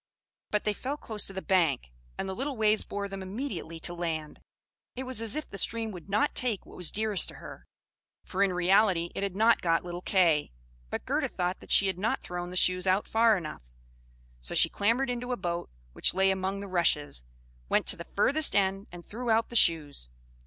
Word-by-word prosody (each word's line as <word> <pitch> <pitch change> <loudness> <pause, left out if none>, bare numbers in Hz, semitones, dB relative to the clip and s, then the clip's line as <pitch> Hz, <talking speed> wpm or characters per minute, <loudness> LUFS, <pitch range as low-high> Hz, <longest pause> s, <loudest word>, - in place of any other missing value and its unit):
But 210 - 0
they 210 - +1
fell 270 +7 -4
close 215 -7 -1
to 195 - -6
the 190 - -5
bank, 160 - +1 0.3
and - - -3
the 190 - -3
little 270 +5 -3
waves 215 0 +3
bore 200 0 -4
them 195 -1 -7
immediately 190 - -5
to 175 - -1
land; 160 -3 -4 0.5
it 260 - -4
was 255 -3 -3
as 225 +3 +1
if 305 - -3
the 195 - -8
stream 225 +3 -1
would 180 -1 -10
not 205 +2 +2
take 235 -6 -1
what - - -14
was 180 -3 -1
dearest 215 -2 +2
to - - -9
her; - - -11 0.6
for 190 - -3
in 200 -1 +4
reality 180 -1 +3
it - - -4
had 200 -2 -2
not 225 +3 +4
got 165 -1 +2
little 175 0 -6
Kay; 170 - +2 0.4
but - - -4
Gerda - - 0
thought 180 +1 -2
that - - -15
she 200 - +6
had 190 -2 -1
not 215 +3 -1
thrown 175 0 -5
the 180 - -4
shoes 185 +1 +2
out 190 +2 +3
far 225 -1 +4
enough, 150 - -8 0.7
so - - -4
she - - +5
clambered 240 +6 +1
into 245 +1 -4
a - - -2
boat 175 -1 -3 0.2
which - - +2
lay 190 0 +4
among 190 +1 -2
the 200 - -6
rushes, 150 - +2 0.5
went - - +2
to - - +4
the - - -9
farthest 305 +2 +2
end, 195 0 +1
and 175 -1 -10
threw 240 +3 -5
out 225 0 +3
the 235 - -9
shoes. 150 - +2
195 Hz, 215 wpm, -29 LUFS, 175-220 Hz, 0.7 s, she